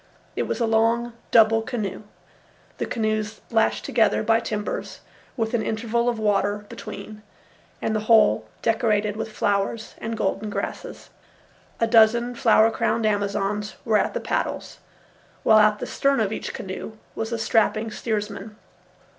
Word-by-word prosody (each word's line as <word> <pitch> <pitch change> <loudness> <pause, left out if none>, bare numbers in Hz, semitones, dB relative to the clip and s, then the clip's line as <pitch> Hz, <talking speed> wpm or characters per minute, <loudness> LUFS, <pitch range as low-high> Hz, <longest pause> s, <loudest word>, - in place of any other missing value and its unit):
It - - -1
was - - -2
a 235 - +2
long 230 +1 +2 0.2
double 225 0 +5
canoe, 215 -5 -4 0.8
the - - -2
canoes 215 -2 -2
lashed 225 -1 +1
together 225 -2 +2
by 225 +1 +3
timbers 215 -2 -4 0.4
with 225 -1 -1
an 235 - +2
interval 230 +2 0
of 235 - -2
water 205 -1 0
between, 210 +2 -8 0.6
and 220 - 0
the - - +1
whole 160 - +5 0.2
decorated 215 -2 +1
with 220 0 -4
flowers 205 +2 -1
and 225 0 -4
golden 200 +2 -1
grasses. - - -6 0.7
A 230 - +3
dozen 235 +1 +4
flower 225 -3 +4
crowned 225 0 0
Amazons 205 0 -1
were 215 -2 +3
at - - -1
the - - 0
paddles, - - -3 0.6
while 220 -1 +6
at 210 0 +4
the - - -5
stern 275 -1 +1
of 215 -1 0
each - - -4
canoe 190 +3 -6 0.2
was 225 +1 -4
a 230 - -1
strapping 220 0 +1
steersman. 210 -1 -4
220 Hz, 145 wpm, -24 LUFS, 210-230 Hz, 0.8 s, while